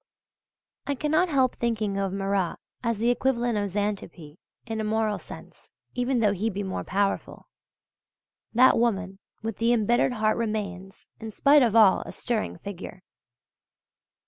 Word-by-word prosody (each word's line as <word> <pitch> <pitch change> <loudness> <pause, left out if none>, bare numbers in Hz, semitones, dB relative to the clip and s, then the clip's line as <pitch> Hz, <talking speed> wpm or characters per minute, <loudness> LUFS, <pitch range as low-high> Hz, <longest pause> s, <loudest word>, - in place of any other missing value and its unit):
I 285 - 0
cannot 310 +6 +1
help 260 -4 +2
thinking 215 -4 -1
of 195 -1 -1
Marat 195 -2 -1 0.3
as 230 -3 -1
the 235 +3 +2
equivalent 245 -1 0
of 205 -1 -2
Xanthippe 190 -6 -4 0.3
in 225 -2 -3
a - - -2
moral 215 -1 0
sense - - -13 0.2
(even 245 0 0
though 210 -2 +4
he 205 +3 -1
be 205 -1 -4
more 190 -1 -4
powerful). 200 +1 -2 1.1
That 250 +1 +5
woman 200 -5 -1 0.2
with 225 -1 -4
the 230 +1 +2
embittered 240 +2 +2
heart 215 -2 +1
remains, 200 -4 -4
in 225 - -6
spite 280 +7 +4
of 230 -4 +2
all, 215 -4 +6
a - - -8
stirring 225 -3 -3
figure. 190 -2 -9
220 Hz, 145 wpm, -26 LUFS, 200-240 Hz, 1.1 s, all